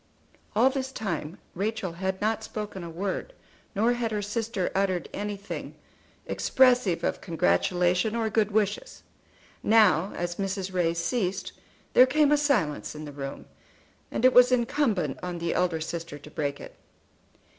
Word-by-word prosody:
All 250 Hz, +5 st, +5 dB
this 265 Hz, -1 st, -3 dB
time 175 Hz, -, -4 dB, 0.2 s
Rachel 205 Hz, 0 st, -2 dB
had 190 Hz, +2 st, -3 dB
not 220 Hz, +1 st, 0 dB
spoken 210 Hz, -4 st, -6 dB
a 170 Hz, -, -6 dB
word, 190 Hz, -, -4 dB, 0.4 s
nor 225 Hz, +4 st, +3 dB
had 240 Hz, -2 st, -1 dB
her 210 Hz, -1 st, -2 dB
sister 215 Hz, -2 st, -2 dB
uttered 190 Hz, -3 st, 0 dB
anything 205 Hz, 0 st, -5 dB, 0.5 s
expressive 245 Hz, -10 st, +3 dB
of -, -, -1 dB
congratulation 175 Hz, -, +1 dB
or 230 Hz, -1 st, 0 dB
good 215 Hz, -1 st, +2 dB
wishes. 215 Hz, -, -1 dB, 0.6 s
Now, 205 Hz, -4 st, +4 dB
as 175 Hz, 0 st, -3 dB
Mrs. 195 Hz, -1 st, -3 dB
Ray 170 Hz, -2 st, +1 dB
ceased, 190 Hz, +1 st, -1 dB, 0.4 s
there 255 Hz, -, +8 dB
came 295 Hz, +2 st, +3 dB
a 295 Hz, -, +5 dB
silence 215 Hz, -, 0 dB
in 155 Hz, 0 st, -7 dB
the 145 Hz, -, -7 dB
room, 140 Hz, -1 st, -7 dB, 0.6 s
and 250 Hz, -, -1 dB
it 255 Hz, -, +6 dB
was 250 Hz, 0 st, +7 dB
incumbent 230 Hz, -, +1 dB
on 180 Hz, -1 st, -4 dB
the 170 Hz, 0 st, -1 dB
elder 180 Hz, -3 st, +1 dB
sister 165 Hz, -1 st, -5 dB
to 150 Hz, +1 st, -13 dB
break 140 Hz, -2 st, -2 dB
it. -, -, -11 dB
195 Hz, 150 wpm, -27 LUFS, 170-225 Hz, 0.6 s, there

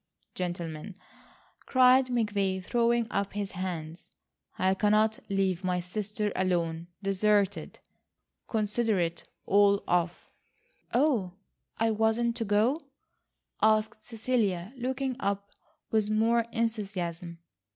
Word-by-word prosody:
Gentlemen," 175 Hz, 0 st, -5 dB, 0.7 s
cried 255 Hz, 0 st, +5 dB
McVay, 205 Hz, -6 st, 0 dB
throwing 235 Hz, 0 st, +2 dB
up 200 Hz, 0 st, -1 dB
his 205 Hz, -1 st, -3 dB
hands, 175 Hz, -3 st, -5 dB, 0.5 s
"I 185 Hz, +1 st, +2 dB
cannot 215 Hz, +2 st, +2 dB
leave 195 Hz, -2 st, 0 dB
my 180 Hz, -1 st, 0 dB
sister 210 Hz, +3 st, -3 dB
alone,—deserted. 185 Hz, +3 st, 0 dB, 0.7 s
Consider 220 Hz, 0 st, 0 dB
it 170 Hz, -1 st, -2 dB, 0.2 s
all 200 Hz, 0 st, +4 dB
off." 175 Hz, 0 st, 0 dB, 0.7 s
"Oh, 240 Hz, -, +2 dB, 0.4 s
I 225 Hz, 0 st, +2 dB
wasn't 225 Hz, +2 st, +1 dB
to 230 Hz, -, -2 dB
go?" 220 Hz, +9 st, +2 dB, 0.8 s
asked 215 Hz, +1 st, +2 dB
Cecilia, 220 Hz, -5 st, -1 dB
looking 260 Hz, +1 st, -2 dB
up 200 Hz, -3 st, -2 dB, 0.4 s
with 215 Hz, -2 st, +2 dB
more 225 Hz, +2 st, +2 dB
enthusiasm. 195 Hz, -7 st, -3 dB
205 Hz, 100 wpm, -29 LUFS, 185-225 Hz, 0.8 s, cried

